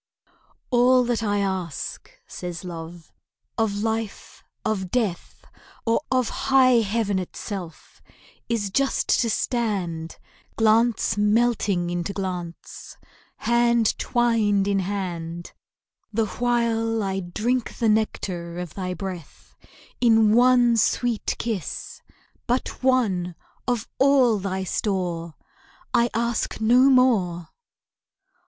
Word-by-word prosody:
"All 250 +1 +5
that 240 -2 -1
I 205 -2 0
ask," 185 -5 -4 0.2
says 175 -1 -7
Love, 170 -1 -9 0.4
"of 210 -2 -1
life, 225 -1 -4 0.2
of 190 -4 -1
death, 210 -6 -2 0.4
Or 230 +3 +2
of 255 -2 +2 0.2
high 255 -2 +6
heaven 205 -2 0
itself, 180 -1 -7 0.5
is 210 -4 -1
just 275 +5 0
to 235 - 0
stand, 190 -10 -2 0.4
Glance 225 0 +2
melting 210 -5 +2
into 175 +2 -3
glance, 180 -4 -6 0.4
hand 235 -1 +2
twined 220 -5 +2
in 200 -1 +1
hand, 175 -3 -4 0.6
The 220 +1 +1
while 225 -1 0
I 195 -1 -1
drink 220 +7 -2
the 230 - +1
nectar 185 -5 -1
of 180 -3 -6
thy 185 -2 -4
breath 185 -6 -8 0.4
In 225 -3 +5
one 245 -1 +5
sweet 235 0 0
kiss, 215 -9 -4 0.5
but 245 +1 -2
one, 205 -10 +1 0.3
of 245 -4 -1
all 260 -5 +4
thy 190 0 -3
store, 175 -4 -2 0.6
I 240 -1 +3
ask 235 0 -1
no 245 +5 +5
more." 200 -11 +2
215 Hz, 105 wpm, -24 LUFS, 185-235 Hz, 0.6 s, high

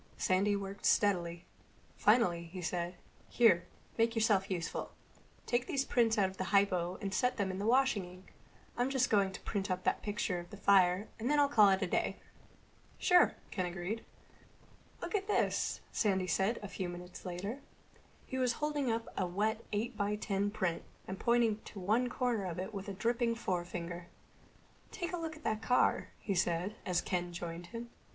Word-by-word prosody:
Sandy 195 +2 +2
worked 200 0 -5
steadily. 175 -4 +2 0.5
Finally 180 -6 +3
he 180 +3 -8
said, 175 0 -2 0.3
"Here, 220 -8 +4 0.3
make 230 +1 +3
yourself 210 -3 +2
useful. 175 -3 -3 0.5
Take 240 0 0
these 275 -1 0
prints 230 -2 +2
out 195 -2 +4
of 190 0 -9
the 185 - -2
hypo 185 -3 +2
and 195 -1 -3
set 250 +5 +1
them 200 -3 0
washing 235 -1 +3
in - - -10
the 180 - -12
sink. - - -21 0.4
I'm 245 +2 +1
just 265 -2 +1
going 200 -3 +3
to - - -8
print 200 -2 -2
up 185 0 -1
that - - +1
picture 205 -3 -1
of 175 0 -9
the 205 - -9
fire 190 0 +4
and 235 +4 -1
then 295 0 +4
I'll 285 - +5
call 215 -8 +6
it 190 0 +2
a - - 0
day." - - 0 0.8
"Sure," 360 -1 +5 0.2
Ken 185 -2 -1
agreed. 180 +5 -4 1.0
"Look - - -5
at 400 -1 0
this," 420 - +1
Sandy 190 -4 +1
said 195 +6 +1
a - - -4
few 190 -2 -4
minutes 180 +1 -9
later. 190 +8 -4 0.7
He 260 - -4
was 250 -2 +2
holding 295 -1 -1
up 225 0 -2
a 185 - 0
wet 215 +5 -1
eight 220 +4 -1
by 205 0 0
ten 200 -1 -1
print 185 -5 -1 0.3
and 190 0 -5
pointing 235 -2 +2
to 205 - -9
one 220 +7 +2
corner 240 -6 0
of 175 -3 -4
it 190 +4 -4
with 195 0 -5
a - - -4
dripping 230 +3 +1
forefinger. 175 -4 -3 0.8
"Take 350 +1 -4
a - - 0
look 325 -1 -4
at 310 - -15
that 215 -1 -1
car," 250 +2 +2
he 200 - -2
said, 175 +2 0
as 180 -1 +2
Ken 175 -1 -2
joined 170 0 -6
him. 235 +3 -7
200 Hz, 185 wpm, -33 LUFS, 180-230 Hz, 1.0 s, call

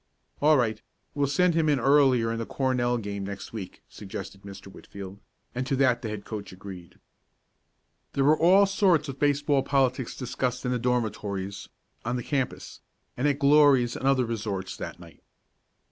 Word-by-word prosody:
"All 150 +1 +5
right, 110 -4 0 0.3
we'll 145 -1 0
send 175 +5 +2
him 160 -1 +2
in 145 -3 +2
earlier 130 -4 +4
in 115 - -3
the 115 - -3
Cornell 125 -2 0
game 100 -3 -5
next 100 +2 -7
week," 100 -5 -8
suggested 100 -1 -8
Mr. 100 -1 -11
Whitfield, 95 0 -10 0.3
and 125 +1 -3
to 135 - 0
that 125 -3 +2
the 115 - -4
head 105 -1 -6
coach 105 -2 -6
agreed. 95 -2 -11 1.2
There 135 - +1
were 150 +3 +5
all 190 +4 +6
sorts 185 -6 +2
of 135 0 -7
baseball 145 -1 +2
politics 130 -3 0
discussed 125 -1 -3
in 125 - 0
the 125 - 0
dormitories, 105 -5 -2 0.3
on 120 +2 -2
the 125 - -3
campus, 135 -1 -3 0.3
and 130 +4 0
at 140 -2 +1
Glory's 140 -4 +4
and 135 - -2
other 135 -2 +3
resorts 105 -5 -4
that - - -7
night. 85 -2 -15
125 Hz, 170 wpm, -27 LUFS, 105-140 Hz, 1.2 s, all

